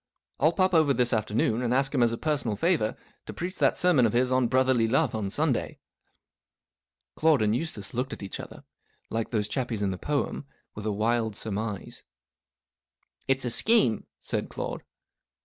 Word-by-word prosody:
I'll 155 +3 +4
pop 185 +1 +1
over 155 -5 +4
this 125 0 +2
afternoon, 110 +1 0
and 120 -1 -1
ask 135 +1 +1
him 130 - +2
as 120 -1 +4
a 115 - -3
personal 145 -8 -1
favour, 145 - +1 0.3
to - - -6
preach 180 +2 -5
that - - +3
sermon 155 -10 +4
of 105 - -3
his* 125 +1 +2
on 130 -1 +3
Brotherly 130 -2 +2
Love 130 +5 +1
on 105 -3 -2
Sunday." 145 +4 0 1.4
Claude 155 -7 +3
and 105 +1 +2
Eustace 120 -8 -4
looked 125 +3 -2
at - - -7
each 95 - -6
other, - - -10 0.5
like 115 0 -2
those 105 -3 0
chappies 120 -6 -2
in 100 - 0
the 90 - -6
poem, 145 -1 -2 0.3
with 105 +1 -6
a - - +1
wild 110 +1 0
surmise. 105 -1 -5 0.6
" - - -46
It's 135 -1 +1
a 120 - 0
scheme," 205 - +3
said - - -3
Claude. - - -5
120 Hz, 180 wpm, -27 LUFS, 110-140 Hz, 1.4 s, I'll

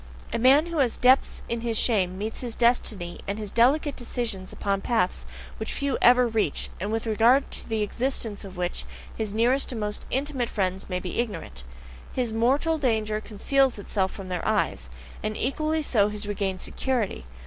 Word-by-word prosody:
A - - 0
man 270 +6 +6
who 335 -2 -3
has 250 -4 +2
depths 255 +2 +3
in 235 0 -2
his 230 -1 0
shame 185 -7 +3
meets 215 +3 -4
his 240 -3 -3
destiny 220 -7 +1
and 200 +1 -2
his 210 -2 -5
delicate 275 +5 +3
decisions 230 -6 -4
upon 195 -1 -1
paths 225 -6 0 0.3
which - - -4
few 280 -1 -1
ever 250 0 +6
reach, 220 -10 0
and 205 +4 -3
with 225 +1 -1
regard 230 +5 +4
to - - -5
the 220 -1 0
existence 230 -1 -1
of 190 -2 -10
which 180 0 -2 0.3
his 220 -2 -3
nearest 245 +7 +2
and 235 - -4
most 210 -1 -3
intimate 265 -3 -1
friends 190 -2 -2
may 180 -1 -1
be 180 +3 -4
ignorant; 200 - -3 0.5
his 245 -4 -1
mortal 275 +8 +2
danger 215 -5 0
conceals 260 +5 +1
itself 195 -1 -1
from 190 -1 -8
their 180 -1 -3
eyes, - - 0 0.3
and 215 0 -3
equally 310 +4 0
so 210 -7 +3
his 210 0 -5
regained 195 -2 -2
security. 240 - -1
225 Hz, 180 wpm, -26 LUFS, 200-255 Hz, 0.5 s, man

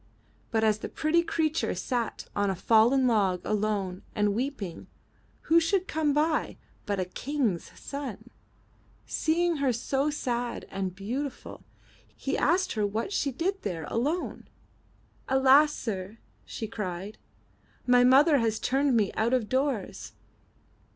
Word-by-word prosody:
But 220 -1 +1
as 215 -1 +3
the - - -5
pretty 320 +2 +2
creature 320 - 0
sat 235 +5 -3
on 205 -1 +1
a 190 - -1
fallen 230 +7 +4
log 200 -6 +2
alone 205 -3 -1
and 210 -1 +2
weeping, 225 - -4 0.5
who 330 +1 +4
should 370 +3 0
come 310 -2 +1
by 305 +2 0 0.3
but 200 -1 -1
a 185 - 0
King's 235 - -2
son. 245 -5 -7 0.7
Seeing 335 +1 +1
her 275 -2 +2
so 270 +5 0
sad 245 -5 -3
and 190 -2 -3
beautiful, 250 +8 -5 0.5
he 270 - -2
asked 365 +4 +2
her 210 -2 0
what 225 - -3
she 280 - 0
did 370 +9 -2
there 175 -6 -4
alone. 295 +10 -2 0.8
AlaS; 265 +3 +6
sir," 205 -6 -5 0.3
she 220 - -5
cried, 200 -1 -5 0.7
my 245 0 +5
mother 275 +4 +6
has 225 -2 0
turned 270 0 +1
me 205 -3 +1
out 230 +3 0
of 225 -4 -1
doors." 260 -6 -2
245 Hz, 135 wpm, -28 LUFS, 210-290 Hz, 0.8 s, AlaS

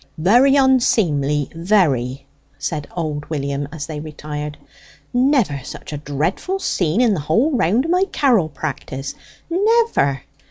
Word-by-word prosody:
"Very 240 - +5
onseemly 175 - +2
very!" 160 - +1 0.3
said 150 -3 -4
old 150 -3 -3
William, 140 -2 -2
as 155 -3 -5
they 155 -2 -6
retired. 150 -1 -6 0.6
"Never 245 - +2
such 150 - -8
a - - -3
dreadful 155 - -2
scene 180 - 0
in 235 -4 +4
the 185 - -1
whole 230 - +1
round 235 - +2
o' - - -3
my 365 +2 +3
carrel 235 - +2
practice 140 -2 -5 0.3
never! 385 - +2
160 Hz, 130 wpm, -20 LUFS, -, 0.6 s, Very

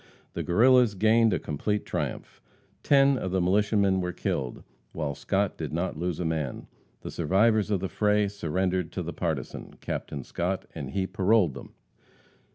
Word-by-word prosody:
The - - -3
Guerrillas 120 +3 +4
gained 110 +3 +4
a - - +2
complete 105 +8 -2
triumph. - - -4 0.4
Ten 140 -2 +4
of 95 - -3
the 95 +1 0
militiamen 100 +1 +2
were 90 0 -2
killed, 65 -7 -3 0.3
while 75 -3 -2
Scott - - -1
did - - -4
not 85 +4 -2
lose 85 +1 -3
a 90 - -2
man. 80 -5 -2 0.4
The - - -7
survivors 105 +6 +2
of 100 -4 0
the 95 - -1
fray 105 +1 +2
surrendered 90 -2 -1
to 90 - -3
the 85 - -5
partisan, 80 -6 -4
Captain 70 -2 -5
Scott, 90 +7 -3
and 70 -5 -6
he 95 +5 -1
paroled 95 -4 +2
them. 70 - -11
95 Hz, 165 wpm, -27 LUFS, 85-105 Hz, 0.4 s, Guerrillas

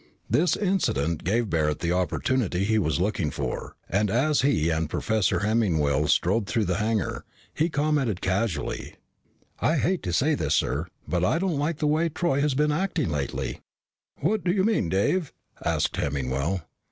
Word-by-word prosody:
This 175 +3 +2
incident 85 - 0
gave 110 +5 0
Barret 75 -2 +1
the 85 - -1
opportunity 90 +2 0
he 110 +2 +2
was 80 -5 0
looking 95 -4 0
for, - - -4
and 105 +2 +1
as 140 +7 +2
he 110 - +2
and 80 -1 -1
Professor 110 +4 0
Hemmingwell 80 -10 +2
strode 100 +8 +2
through 105 +4 0
the 90 0 0
hangar, 110 0 -1 0.3
he 160 +3 +1
commented 145 - 0
casually, 95 -4 -2 0.6
"I 160 - +2
hate 175 +4 +1
to 90 - -3
say 145 - +2
this, - - 0
sir, - - 0 0.2
but 90 -1 0
I 90 - +2
don't 175 -4 0
like 150 +2 -1
the 155 - -1
way 155 +3 +2
Troy 160 -3 0
has 145 -2 +1
been 150 +2 +2
acting 160 - 0
lately." 70 -2 -3 0.6
"What 210 +7 +1
do 175 - +2
you 190 0 +2
mean, 210 - +1
Dave?" 140 - +1 0.3
asked - - 0
Hemmingwell. 70 +5 -1
110 Hz, 165 wpm, -26 LUFS, -, 0.6 s, This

